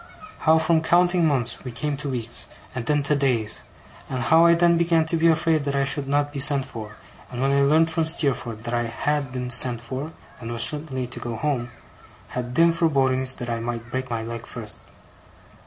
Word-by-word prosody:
How 160 0 +4
from 160 0 +2
counting 175 +1 +3
months, 125 -6 -1
we 125 - -6
came 145 +5 -2
to 140 +1 -4
weeks, 120 -3 -4 0.3
and 125 -2 -5
then 145 -1 +2
to 150 +1 +1
days; 125 -6 0 0.5
and 130 -2 -3
how 165 +6 +5
I 170 - +6
then 170 0 +4
began 165 -1 +2
to 165 - 0
be 165 +1 +3
afraid 160 -1 +2
that 140 -1 -1
I 140 - +2
should 140 0 -1
not 145 +1 0
be 140 - -4
sent 140 -1 +4
for 110 -5 -9 0.3
and 120 - -7
when 135 +1 +1
I 140 0 +3
learnt 160 +4 +3
from 160 0 0
Steerforth 125 -8 -1
that 120 - -4
I 120 0 0
had 140 +3 -2
been 125 -1 -4
sent 120 0 +3
for, 130 +6 -6 0.3
and 115 -1 -7
was 115 -1 0
certainly 145 -4 -2
to 120 - -7
go 120 -1 -5
home, 130 -2 -2 0.6
had 125 0 -5
dim 165 0 +5
forebodings 135 -6 +2
that 120 - -6
I 115 - -2
might 120 0 -5
break 130 0 -3
my 115 -2 -3
leg 115 +1 -7
first. 110 -4 -5
135 Hz, 210 wpm, -23 LUFS, 120-160 Hz, 0.6 s, I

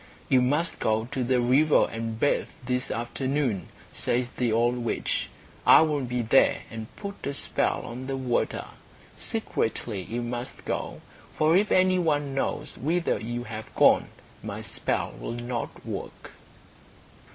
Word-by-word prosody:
"You 130 - +5
must 145 +7 +1
go 110 0 +1
to 130 -3 -1
the 125 +1 +2
river 135 +6 +4
and 115 0 -4
bathe 145 - +2 0.2
this 125 +1 -1
afternoon," 125 - -1 0.3
says 125 0 0
the 125 -2 -1
old 120 +2 +2
witch. 120 -1 -1 0.3
"I - - +8
will 150 -3 +1
be 125 -1 -1
there 115 +4 +4
and 110 -1 -6
put 200 -1 -7
a 140 - -2
spell - - +1
on 125 +3 -6
the 135 0 -2
water. 125 -2 -1 0.5
Secretly 115 - -2
you 120 +6 -4
must 120 +1 -5
go, - - -3 0.4
for 155 +2 +4
if 205 +3 +3
any 185 0 +4
one 145 -5 +1
knows 135 - -2
whither 165 -1 +1
you 120 +3 -4
have 110 -2 -8
gone - - +5 0.3
my - - -5
spell - - -2
will - - -4
not 120 0 -5
work." - - -6
125 Hz, 150 wpm, -27 LUFS, 120-145 Hz, 0.5 s, I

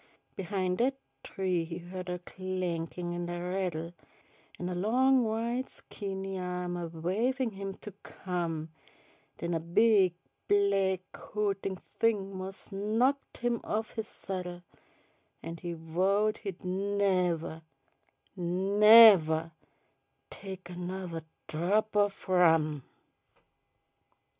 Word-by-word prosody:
Behin' 185 -1 -1
dat 260 +3 +2 0.3
tree 185 -3 -1
he 165 +1 -6
hu'd 180 +1 -7
a 180 - -2
clankin' 180 -1 -4
an' 175 0 -3
a 175 0 -3
rattle, 175 -3 -2 0.6
An' 180 - -4
a 180 - -2
long 250 +8 +3
white 235 +3 -1
skinny 195 -2 -5
ahm 180 -1 -3
a 175 -1 -3
wavin' 220 +10 -1
him 195 -1 -6
to 210 - -10
come, 170 -3 -4 0.7
Den 170 0 -2
a 165 - +1
big 185 +2 +4 0.3
black 195 -2 +3
hootin' 200 -2 -2
thing 195 0 -1
mos' 190 +2 -5
knocked 225 +8 0
him 240 -1 +1
off 220 +1 -2
his 220 -2 -3
saddle, 180 -2 -5 0.8
An' 165 - -6
he 175 0 -5
vowed 190 +6 +1
he'd 190 -4 -7
nevuh, 185 -4 0 0.7
nevuh 190 -2 +7 0.8
tech 190 -2 -8
anothuh 175 -1 -5 0.2
drop 205 +7 0
o' 205 0 +5 0.2
rum. 160 -5 +4
185 Hz, 110 wpm, -30 LUFS, 175-205 Hz, 0.8 s, nevuh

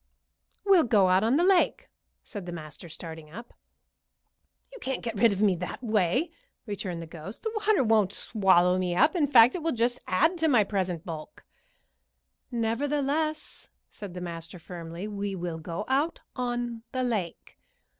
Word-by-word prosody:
"We'll 385 -6 +5
go 205 -6 +4
out 185 +2 +4
on 230 +4 +3
the 340 - +3
lake," 375 -1 +3 0.4
said 200 -4 -8
the - - -4
master, 155 0 -9
starting 160 -1 -8
up. 230 +9 -10 1.2
"You - - -10
can't 265 0 -3
get 230 -2 -3
rid 225 +2 +4
of 200 +1 -1
me 200 -3 +5
that 180 +8 -6
way," 220 - +1 0.3
returned 190 -5 -4
the - - -7
ghost. 165 +5 -10
"The 445 - -2 0.2
water 425 -10 +4
won't 215 -4 +3
swallow 185 -4 +3
me 180 -1 -1
up; 305 - +4
in 310 -5 +2
fact, 245 -3 +7
it 360 - -4
will 325 +1 0
just 240 +1 0
add 320 - +2
to 320 - +2
my 245 -8 +5
present 185 -5 -2
bulk." 165 - -8 1.0
"Nevertheless," 285 +6 -1 0.2
said 200 -4 -9
the 180 - -5
master, 170 0 -6
firmly, 170 +2 -7
"we 200 -1 -4
will 175 -2 -4
go 170 +5 -5
out 285 +6 0 0.2
on 240 -2 -3
the 255 0 0
lake." 210 -9 -3
210 Hz, 165 wpm, -27 LUFS, 180-255 Hz, 1.2 s, fact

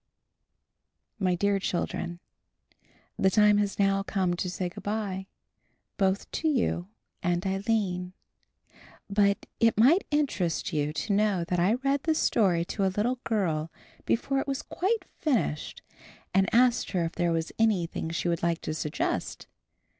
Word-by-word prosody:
MY 185 -2 +2
DEAR 200 +2 +1
CHILDREN: 175 -1 -3 1.0
The 190 - +4
time 210 +1 +5
has 205 -1 -1
now 195 -1 +2
come 190 -3 0
to 180 +1 -2
say 180 0 -2
good 175 - -9
bye, 200 -3 -3 0.7
both 195 -1 0
to 320 - -1
you 240 - 0 0.3
and 175 0 0
Aline; 190 -2 -1 1.0
but 200 0 +2
it 230 -2 +3
might 310 - +5
interest 230 - 0
you 150 -1 0
to 180 +7 -2
know 200 -3 +2
that 175 +1 -1
I 190 +6 +3
read 275 +2 0
the 320 +1 +1
story 185 - +2
to 200 - -2
a - - +4
little 245 +4 +1
girl 165 -8 -1 0.4
before 270 +3 +1
it 270 - -3
was 275 -1 -2
quite 425 +5 -1
finished 245 - -1 0.5
and 190 0 +3
asked 245 -1 +3
her 175 -3 +1
if 165 - -3
there 175 -1 0
was 165 -1 -1
anything 185 -7 +1
she 170 +1 -2
would 170 -1 0
like 170 -1 0
to 155 - -3
suggest. 150 -1 -2
195 Hz, 150 wpm, -28 LUFS, 175-225 Hz, 1.0 s, time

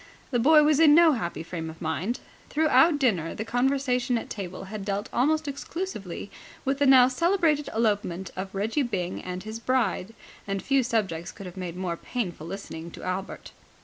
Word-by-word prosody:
The 245 - +2
boy 300 +5 +6
was 300 0 +3
in 305 -2 +7
no 335 -1 +7
happy 175 - -3
frame 165 -1 -5
of 160 - -11
mind. 175 +9 -2 0.3
Throughout 315 +1 +4
dinner 195 - +1
the 220 - -4
conversation 250 0 +1
at - - -6
table 185 -3 -6
had 200 +1 -6
dealt 200 +1 -3
almost 310 +4 +2
exclusively 280 - -5 0.3
with 270 +1 0
the 285 - +4
now 260 -2 +8
celebrated 320 +1 +1
elopement 205 -5 -1
of 190 +1 -6
Reggie 220 +9 0
Byng 190 -8 -2
and 180 0 -6
his 220 +1 -6
bride, 225 -4 0 0.3
and 195 -1 -2
few 275 -1 +3
subjects 195 -8 -1
could 195 - -11
have 180 - -9
made 180 -3 -5
more 180 -2 -3
painful 175 -10 -4
listening 170 -3 -7
to - - -11
Albert. 185 +1 -4
220 Hz, 180 wpm, -26 LUFS, 185-275 Hz, 0.3 s, now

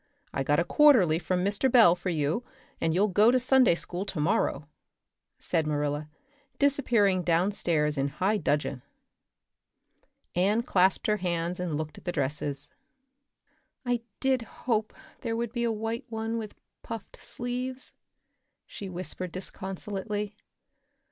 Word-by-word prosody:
I - - -1
got 145 +2 +2
a - - +3
quarterly 210 - +5
from 180 +2 -1
Mr. 205 +6 +1
Bell 225 -9 +7
for 180 +1 -4
you 160 - 0 0.4
and 165 - +2
you'll 190 +6 +3
go 210 +3 +5
to 255 +1 +4
Sunday 255 -6 +4
school 175 +2 -3
tomorrow," 170 -5 0 0.7
said 160 -2 -1
Marilla, 150 0 -1 0.5
disappearing 240 -9 +3
downstairs 165 -4 +1
in 135 - +1
high 190 +9 0
dudgeon. 145 -5 -1 1.5
Anne 205 +6 +2
clasped 190 -3 +2
her 210 0 +2
hands 175 -1 -2
and 170 -5 -2
looked 155 -1 -5
at - - -24
the 175 - 0
dresses. 145 -1 -3 1.1
"I 245 -1 0 0.2
did 265 -2 +2
hope 220 -1 -2 0.3
there 230 -1 -2
would 235 -1 -2
be 240 -1 -1
a 230 - +1
white 225 +2 -3
one 225 0 -2
with 215 -2 -7 0.3
puffed 225 -3 -8
sleeves," 250 +1 -5 0.7
she 200 - -8
whispered 185 0 -4
disconsolately. 195 +2 -5
190 Hz, 135 wpm, -28 LUFS, 165-230 Hz, 1.5 s, Bell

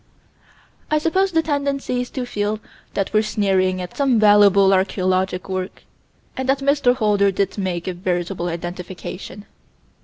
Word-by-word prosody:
I 305 - +2
suppose 375 +5 +1
the 325 -1 +2
tendency 280 -4 -1
is 250 - -5
to 255 -2 -4
feel 210 -2 -2 0.4
that 195 +1 -2
we're 215 - +4
sneering 190 -3 +1
at 180 -1 -7
some 270 -5 +2
valuable 205 -2 +6
archaeologic 185 -1 0
work, 185 -1 -5 0.5
and 260 0 -3
that 270 - +4
Mr. 275 -2 +2
Holder 205 -4 +2
did 195 +1 -1
make 180 -3 -3
a 185 - -1
veritable 175 0 -2
identification. 180 +3 -7
200 Hz, 145 wpm, -21 LUFS, 185-255 Hz, 0.5 s, valuable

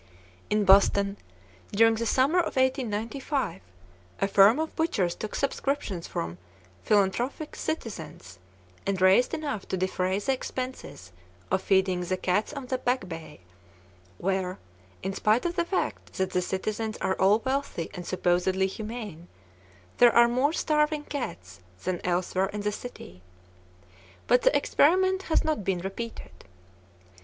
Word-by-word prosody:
In 210 -1 +2
Boston, 200 +1 +5 0.6
during 225 +2 +5
the 230 +1 -2
summer 275 +10 +3
of 345 - -1
1895, 260 - -1 0.6
a 195 - +2
firm 200 +4 +6
of 320 0 -3
butchers 200 - 0
took 215 - -6
subscriptions 275 -10 -2
from 85 +1 -4 0.4
philanthropic 225 +9 0
citizens, 165 - -6 0.5
and 195 -2 0
raised 190 +6 +5
enough 295 - -4
to 190 - -2
defray 185 0 0
the 265 +7 0
expenses 255 - -6 0.4
of 190 - +2
feeding 190 -2 +2
the 185 +1 -2
cats 185 +3 0
on 280 -3 -6
the 255 0 -2
Back 245 -5 0
Bay, 160 - -9 0.8
where, 190 0 -1 0.5
in 190 +1 -2
spite 215 - +2
of 345 0 -1
the 345 -2 +1
fact 370 +2 -3
that 190 0 -1
the 180 - +1
citizens 215 +4 -3
are 190 - 0
all 195 +3 +6
wealthy 265 -10 -2
and 180 -2 -6
supposedly 185 +1 +1
humane, 210 -4 -6 0.7
there 240 -1 +6
are 235 0 +7
more 255 +5 +2
starving 300 -2 +1
cats 95 - -6 0.2
than 185 -2 -2
elsewhere 180 +1 0
in 210 - -4
the 210 0 0
city. 90 - -9 1.0
But 245 0 +4
the - - +4
experiment 375 +6 +3
has 320 - +3
not 310 -9 -1
been 190 -1 0
repeated. 195 +6 -6
210 Hz, 140 wpm, -27 LUFS, 185-260 Hz, 1.0 s, are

